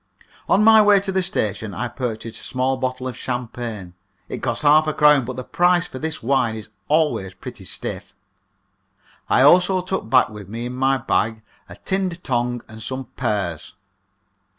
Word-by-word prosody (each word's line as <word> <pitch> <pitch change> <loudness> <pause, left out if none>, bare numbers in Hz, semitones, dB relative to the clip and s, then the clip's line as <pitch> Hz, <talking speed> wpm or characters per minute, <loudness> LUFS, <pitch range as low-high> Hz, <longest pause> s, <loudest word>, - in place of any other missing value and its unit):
On 200 - +4
my 220 0 +8
way 205 -1 +6
to 195 0 -3
the 190 0 +1
station 110 - -3
I 120 +3 -2
purchased 115 -3 -5
a - - -10
small 130 +1 0
bottle 130 0 -3
of 125 - -5
champagne, 120 -7 -5 0.4
it - - -5
cost 120 +1 -2
half 155 +1 +5
a 155 - 0
crown, 150 -4 +5
but 130 +1 -5
the 130 - -5
price 175 +4 +2
for 130 - -8
this 160 -3 -4
wine 125 -3 +1
is 110 -3 -9 0.2
always 150 - +1
pretty - - -10
stiff. - - -6 1.1
I 130 - +4
also 180 +5 +5
took 185 -9 -4
back 130 +1 +4
with 105 -3 -10
me 115 +3 -5
in 125 - -5
my 135 +1 +2
bag 110 -3 -1 0.3
a - - -10
tinned 185 -2 -2
tongue 120 -2 -1
and 110 0 -11
some 130 +4 -5
pears. 85 -5 -3
130 Hz, 175 wpm, -21 LUFS, 115-155 Hz, 1.1 s, my